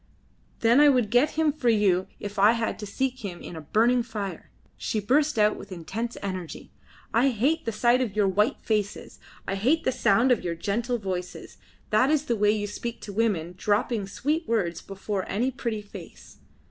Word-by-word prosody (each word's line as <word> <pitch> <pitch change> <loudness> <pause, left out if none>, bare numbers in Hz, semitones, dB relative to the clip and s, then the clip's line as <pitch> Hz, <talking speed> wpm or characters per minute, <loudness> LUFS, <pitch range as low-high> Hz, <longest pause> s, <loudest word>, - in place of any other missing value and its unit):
"Then 235 +3 +5
I 295 0 +7
would 245 -6 +2
get 245 +5 +3
him 320 -2 +3
for 270 -5 0
you 195 -4 +2
if 205 -1 -6
I 210 +3 +6
had 230 -2 -2
to 210 - -6
seek 260 +5 -2
him 180 -4 -5
in - - -9
a 160 - -7
burning 230 +10 +2
fire," 205 -7 -6 0.3
she 215 - -2
burst 280 +7 +2
out 210 0 +3
with - - -11
intense 215 +7 -5
energy. 185 -4 -6 0.4
"I 250 +4 +4
hate 265 +7 0
the 230 - -1
sight 240 +3 +3
of 220 -6 -2
your 205 -2 +3
white 210 +4 +1
faces. 210 -2 -2 0.3
I - - -1
hate 260 +12 +1
the - - +1
sound 245 +1 +3
of 245 - +2
your 170 -1 -2
gentle 230 +8 -1
voices. 185 -4 -6 0.3
That 215 +6 +4
is 305 -1 +2
the 235 - 0
way 210 -1 +2
you 210 -1 +1
speak 230 +3 -5
to 205 - -8
women, 190 -6 0
dropping 210 +2 0
sweet 300 - -2
words 195 -7 -1
before 195 0 -4
any 240 +7 0
pretty 230 -4 -4
face. 205 - -12
215 Hz, 195 wpm, -26 LUFS, 200-245 Hz, 0.4 s, I